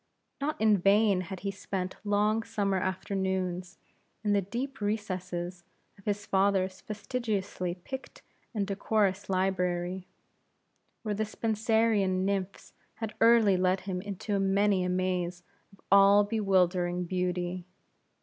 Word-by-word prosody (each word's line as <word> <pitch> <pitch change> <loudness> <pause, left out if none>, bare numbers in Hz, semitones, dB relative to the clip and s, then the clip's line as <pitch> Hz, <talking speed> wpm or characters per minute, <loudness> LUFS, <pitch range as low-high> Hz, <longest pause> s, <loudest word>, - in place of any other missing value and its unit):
Not 300 +2 -2
in 215 -2 +4
vain 200 0 +4
had 185 0 -7
he 200 - -2
spent 190 -1 -4
long 210 +2 +2
summer 200 -3 -1
afternoons 185 -1 -2 0.5
in 205 -1 +2
the 200 - +3
deep 245 +7 -5
recesses 185 -4 -3 0.3
of 200 - -21
his 205 -1 -1
father's 190 -1 +1
fastidiously 205 -5 -3
picked 260 +9 -9 0.3
and 210 -4 -1
decorous 200 0 0
library; 185 -1 -1 1.0
where 215 -2 -1
the 215 +2 -1
Spenserian 215 -3 +1
nymphs 195 -1 -3 0.2
had 225 -2 -5
early 225 -4 +6
led 185 +1 +2
him 185 -2 -4
into 200 +1 -3
many 195 0 +2
a 180 - -1
maze 180 -1 -1 0.3
of 195 - -21
all 200 +1 +7
bewildering 185 -4 +1
beauty. 180 0 -2
195 Hz, 120 wpm, -29 LUFS, 185-210 Hz, 1.0 s, all